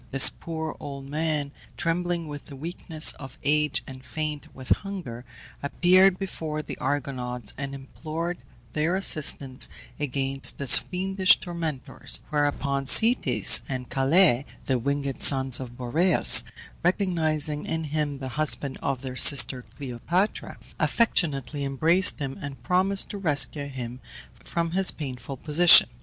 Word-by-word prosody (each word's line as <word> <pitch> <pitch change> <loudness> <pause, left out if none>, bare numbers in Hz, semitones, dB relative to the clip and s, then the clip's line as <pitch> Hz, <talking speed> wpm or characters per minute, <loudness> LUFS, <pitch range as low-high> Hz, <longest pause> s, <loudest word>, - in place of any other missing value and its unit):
This 135 -1 +8
poor 160 -1 -7
old 140 -1 -9
man, 150 -1 -3 0.3
trembling 170 0 -3
with 145 -1 -10
the 140 - -11
weakness 160 +1 -1
of 135 -2 -12
age, 150 +1 0
and 130 -1 -12
faint 155 -1 -6
with 130 -1 -11
hunger, 170 - -9 0.4
appeared 185 +5 +2
before 160 -5 -6
the - - -8
Argonauts, 125 -4 -4
and 140 0 -7
implored 160 +5 -7 0.3
their 155 +4 -1
assistance 140 -7 +2 0.3
against 135 -1 -2
his 140 -3 +7
fiendish 190 +1 +1
tormentors, 165 -6 -3
whereupon 140 -2 -2
Zetes 140 - +6
and 130 -2 -6
Calais, 135 -1 +2 0.2
the 130 -2 -1
winged 140 +1 -4
sons 130 -2 +5
of 120 -2 -10
Boreas, 155 +9 +4 0.4
recognizing 160 -5 -1
in 160 0 -4
him 150 -2 -4
the 135 -1 -8
husband 140 -3 0
of 135 -1 -4
their 130 -1 -7
sister 130 -1 +5
Cleopatra, 145 - -4 0.2
affectionately 150 - -1
embraced 160 +7 +3
him, 135 -3 -7
and 135 -4 -9
promised 190 +6 0
to 205 - -7
rescue 145 -4 +1
him 125 -2 -8 0.3
from 170 -1 -5
his 190 +1 +3
painful 130 -2 -7
position. 165 +5 +6
145 Hz, 130 wpm, -24 LUFS, 135-170 Hz, 0.4 s, This